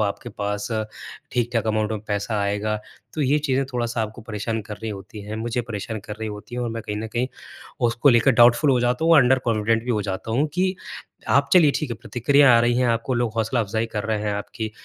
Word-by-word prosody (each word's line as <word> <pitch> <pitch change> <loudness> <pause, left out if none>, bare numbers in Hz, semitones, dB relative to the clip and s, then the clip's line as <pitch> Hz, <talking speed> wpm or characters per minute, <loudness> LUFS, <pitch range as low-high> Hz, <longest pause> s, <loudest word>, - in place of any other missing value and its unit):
आपके 100 - -6
पास 105 -1 -3
अ, 110 -1 -1 0.5
ठीक-ठाक 120 -2 0
अमाउंट 110 0 0
में 110 - -3
पैसा 105 +1 -1
आएगा? 105 +2 -1 0.4
तो 155 - -3
ये 140 +2 +3
चीज़ें 135 -2 0
थोड़ा-सा 120 -1 -1
आपको 110 +2 -6
परेशान 110 +1 -3
कर 105 - -7
रही 110 - -3
होती 105 +2 -8
हैं। 105 +2 -6
मुझे 115 +2 -2
परेशान 110 -1 -5
कर 105 - -5
रही 110 - -3
होती 105 +3 -8
है। - - -2
और 120 - -2
मैं 115 0 -5
कहीं 105 - -4
न 110 +1 -4
कहीं 120 +2 0 0.6
उसको 120 +5 +2
लेकर 120 +3 +4
डाउटफ़ुल 120 +5 +5
हो 125 -2 +3
जाता 125 +5 0
हूँ 165 0 +6
अंडर 130 -1 +5
कॉन्फिडेंट 115 0 +1
भी 125 - -2
हो 105 -3 +1
जाता 95 +2 -4
हूँ 140 +6 +2
कि 185 +1 +1 0.5
आप 140 0 +3
चलिए 170 -5 +7
ठीक 150 - -3
है 120 - -3
प्रतिक्रिया 130 +1 +4
आ - - +5
रही 120 +1 +2
है 125 0 +2
आपको 115 +2 0
लोग 120 -2 0
हौसला 115 +2 +1
अफ़ज़ाई 110 +1 -1
कर 105 0 -2
रहे 110 -1 0
हैं 105 -1 -1
आपकी 110 +2 -5
115 Hz, 235 wpm, -23 LUFS, 105-125 Hz, 0.6 s, चलिए